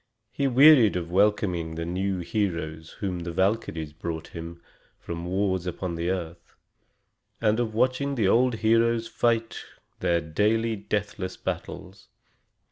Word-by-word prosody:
He 140 - 0
wearied 130 - +7
of 85 -1 -3
welcoming 90 -4 +1
the 85 0 -4
new 95 +2 -2
heroes 85 -6 -3
whom 95 -3 -2
the 85 0 -5
Valkyries 95 -5 -1
brought 80 0 -5
him 85 0 -8 0.4
from 85 0 -6
wars 95 0 -1
upon 90 0 -3
the 85 +1 -2
earth, 85 -2 -5 0.8
and 110 0 +2
of 110 -3 -2
watching 130 +4 +1
the 110 -6 +2
old 125 +4 +3
heroes 115 +1 +2
fight 115 -1 0 0.4
their 85 -1 +2
daily 110 +8 0
deathless 100 -2 -3
battles. - - -6
95 Hz, 130 wpm, -26 LUFS, 85-115 Hz, 0.8 s, wearied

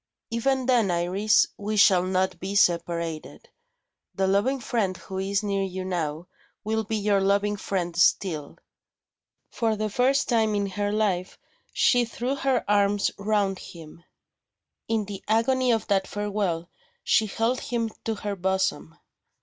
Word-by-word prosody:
"Even 260 +3 0
then, 240 -6 +3
Iris, 185 +5 +2
we 210 +1 -3
shall 190 -3 +6
not 185 +1 -1
be 195 +2 -4
separated. 170 -3 0 0.7
The 195 - +1
loving 205 +8 +1
friend 205 -6 -1
who 190 0 -7
is 200 +2 -1
near 200 -1 -1
you 190 -1 -4
now, 165 -3 -3 0.4
will 220 +1 -1
be 220 +1 -3
your 205 -2 +1
loving 200 +1 +1
friend 180 -4 -3
still." 170 -3 +1 0.9
For 225 -2 0
the 215 0 -3
first 265 +5 +2
time 220 -3 +2
in 200 -1 0
her 205 +1 -2
life, 195 -4 -1 0.3
she 245 -1 +3
threw 240 +3 -3
her 270 -2 0
arms 205 0 +2
round 200 -2 0
him. 165 0 -12 0.8
In 220 -2 0
the 200 -1 -8
agony 250 +3 +2
of 225 -1 0
that 195 -1 +1
farewell, 200 -5 -2 0.4
she 220 - +3
held 230 +5 0
him 230 -2 -2
to 225 - -1
her 205 -1 -4
bosom. 190 -3 -1
200 Hz, 145 wpm, -25 LUFS, 185-220 Hz, 0.9 s, shall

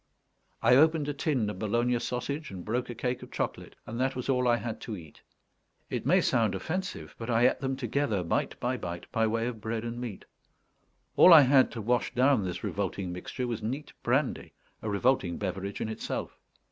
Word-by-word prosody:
I 125 +2 +6
opened 155 0 +4
a - - -1
tin 140 -6 0
of 95 - -9
Bologna 120 +3 +1
sausage, 140 +5 -3
and 90 -5 -8
broke 125 +4 -1
a 120 - -5
cake 125 +2 -2
of - - -10
chocolate, - - -4
and 115 +2 -6
that 130 +1 +1
was 125 +1 -4
all 125 -1 +2
I 120 -1 +4
had 115 -2 -5
to 110 -3 -5
eat. 80 -4 -13 0.7
It - - -2
may - - +5
sound 110 -5 +2
offensive, 180 - -4
but 115 +1 -5
I 120 +1 +5
ate - - 0
them 135 0 -1
together, 125 -5 -1
bite 85 - -1
by 125 +1 -1
bite, 85 -5 -6
by 115 0 +2
way 115 +1 0
of 120 -3 -4
bread 110 0 -3
and 120 +1 -5
meat. 115 -6 -6 0.9
All 185 - +9
I 160 -3 +11
had 135 -1 +5
to 115 - -4
wash 120 0 0
down 130 -3 +4
this 90 -1 -4
revolting 95 -2 -2
mixture 90 +8 -4
was 120 -3 -3
neat 130 +7 -4
brandy: - - 0 0.3
a 110 - -3
revolting 100 -4 +1
beverage 100 0 -4
in - - -2
itself. 110 - -4
120 Hz, 200 wpm, -29 LUFS, 105-130 Hz, 0.9 s, I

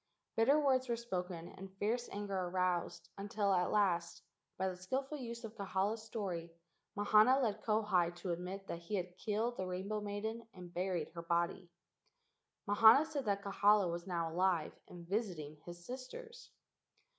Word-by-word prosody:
Bitter 270 +7 +5
words 260 -3 +2
were 235 - +2
spoken 180 -7 -4
and 190 +1 -11
fierce 230 +5 0
anger 205 -1 -3
aroused 180 -1 -1
until 205 -1 0
at 180 -1 +2
last, 170 -4 +1 0.3
by 190 - 0
the 185 - -2
skilful 265 +11 -3
use 235 -1 -6
of 225 -1 -6
Kahala's 200 +1 -1
story, 190 -7 -4 0.5
Mahana 215 +5 +6
led 215 -5 0
Kauhi 205 -6 +2
to 175 +1 -4
admit 180 +3 -4
that 170 - -5
he 170 +5 -4
had 180 -2 -3
killed 225 +3 -1
the 185 - -2
rainbow 195 +4 -3
maiden 215 +3 -4
and 180 -1 -10
buried 180 0 -1
her 170 - -7
body. 170 +1 0 1.0
Mahana 220 +8 +8
said 295 -4 -3
that 200 -1 0
Kahala 200 -1 +4
was 170 +2 -5
now 170 -3 -1
alive 175 -2 +1
and 175 -1 -11
visiting 175 -8 -2
his 175 0 -9
sisters. 460 - -8
195 Hz, 155 wpm, -36 LUFS, 180-225 Hz, 1.0 s, Mahana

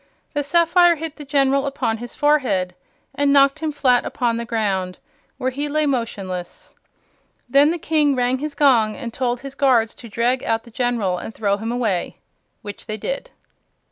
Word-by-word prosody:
The 290 - 0
sapphire 340 +3 +4
hit 320 -1 -6
the 300 - -8
General 275 0 +2
upon 250 -5 -1
his 240 0 -8
forehead 260 -12 +1 0.4
and 285 0 +1
knocked 275 +1 +4
him 315 -1 -2
flat 255 -4 +2
upon 240 -2 -1
the 235 0 -3
ground, 195 -6 -1 0.4
where 260 +1 -1
he 290 +3 -3
lay 305 +1 +1
motionless. 195 -9 -4 0.7
Then 280 +4 +5
the 340 - -1
King 300 -3 +1
rang 250 +1 +1
his 300 0 -5
gong 235 -8 +3
and 235 -3 -7
told 245 -1 -1
his 275 0 -8
guards 250 -5 +2
to 235 - -12
drag 240 +4 0
out 225 0 0
the 235 - -15
General 225 -7 -1
and 220 - -8
throw 200 -2 0
him 225 +2 -4
away; 220 -8 -1 0.5
which 205 -1 -9
they 215 - -4
did. - - -4
255 Hz, 175 wpm, -21 LUFS, 225-285 Hz, 0.7 s, Then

